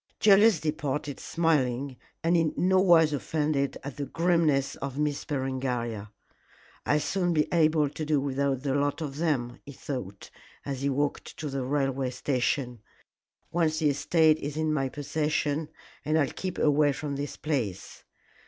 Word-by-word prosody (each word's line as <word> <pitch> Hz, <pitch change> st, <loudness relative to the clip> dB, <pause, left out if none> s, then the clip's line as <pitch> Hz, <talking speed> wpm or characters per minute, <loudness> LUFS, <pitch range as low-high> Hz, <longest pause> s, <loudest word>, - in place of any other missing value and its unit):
Julius 205 Hz, -2 st, +6 dB
departed 150 Hz, -2 st, -3 dB
smiling 140 Hz, -5 st, 0 dB, 0.3 s
and 170 Hz, +1 st, +3 dB
in 165 Hz, -2 st, +1 dB
no 185 Hz, +1 st, +3 dB
wise 165 Hz, -5 st, +5 dB
offended 145 Hz, -1 st, -1 dB
at 140 Hz, +1 st, -7 dB
the 140 Hz, -1 st, -3 dB
grimness 165 Hz, -4 st, +1 dB
of 135 Hz, -1 st, -5 dB
Miss 150 Hz, -1 st, -1 dB
Berengaria. 125 Hz, -6 st, -3 dB, 0.8 s
"I'll 150 Hz, -, +3 dB
soon 175 Hz, +3 st, 0 dB
be 150 Hz, -2 st, +2 dB
able 155 Hz, -2 st, +3 dB
to 150 Hz, +3 st, -6 dB
do 150 Hz, -1 st, +1 dB
without 135 Hz, -1 st, -1 dB
the 135 Hz, -2 st, 0 dB
lot 145 Hz, +3 st, 0 dB
of 145 Hz, -3 st, -5 dB
them," 130 Hz, -7 st, -1 dB
he 140 Hz, -, -10 dB
thought, 125 Hz, -8 st, -7 dB, 0.3 s
as 135 Hz, -2 st, -4 dB
he 140 Hz, -, +1 dB
walked 145 Hz, +1 st, -2 dB
to 150 Hz, -, -4 dB
the 135 Hz, -1 st, -2 dB
railway 135 Hz, -1 st, 0 dB
station, 125 Hz, -2 st, -1 dB, 0.7 s
"once 165 Hz, -2 st, +1 dB
the 155 Hz, -2 st, +2 dB
estate 160 Hz, +2 st, +3 dB
is 145 Hz, +1 st, -5 dB
in 155 Hz, -1 st, +1 dB
my 135 Hz, -3 st, 0 dB
possession, 150 Hz, +1 st, -1 dB, 0.3 s
and 155 Hz, +1 st, +1 dB
I'll 145 Hz, -4 st, +2 dB
keep 185 Hz, -2 st, -4 dB
away 145 Hz, -1 st, +3 dB
from 145 Hz, 0 st, -4 dB
this 140 Hz, +1 st, -5 dB
place. 120 Hz, -, -3 dB
145 Hz, 155 wpm, -28 LUFS, 135-155 Hz, 0.8 s, Julius